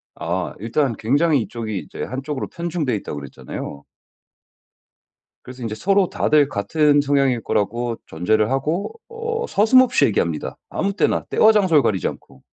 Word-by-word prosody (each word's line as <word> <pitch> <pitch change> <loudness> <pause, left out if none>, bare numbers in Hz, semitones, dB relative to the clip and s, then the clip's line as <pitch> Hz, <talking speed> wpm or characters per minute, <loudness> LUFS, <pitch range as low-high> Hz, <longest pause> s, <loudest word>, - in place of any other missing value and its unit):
아. 90 +2 -3
일단 120 +4 0
굉장히 145 +4 +2
이쪽이 110 -3 -4
이제 - - -7
한쪽으로 135 +2 -4
편중돼 165 -8 -2
있다고 75 -7 -5
그랬잖아요. 70 +1 -8 1.6
그래서 130 0 -11
인제 115 -2 -3
서로 195 - +2
다들 150 -2 +3
같은 145 +6 +2
성향일 140 -4 +1
거라고 115 +3 -1
전제를 105 +7 +1
하고 155 - -1 0.2
어 460 0 -3
서슴없이 255 +5 +4
얘기합니다, 85 -7 -1
아무 200 +1 -1
때나 - - +1
때와 220 - +5
장소를 185 -9 +4
가리지 100 -5 0
않고. 65 -1 -9
135 Hz, 345 characters per minute, -21 LUFS, 110-170 Hz, 1.6 s, 때와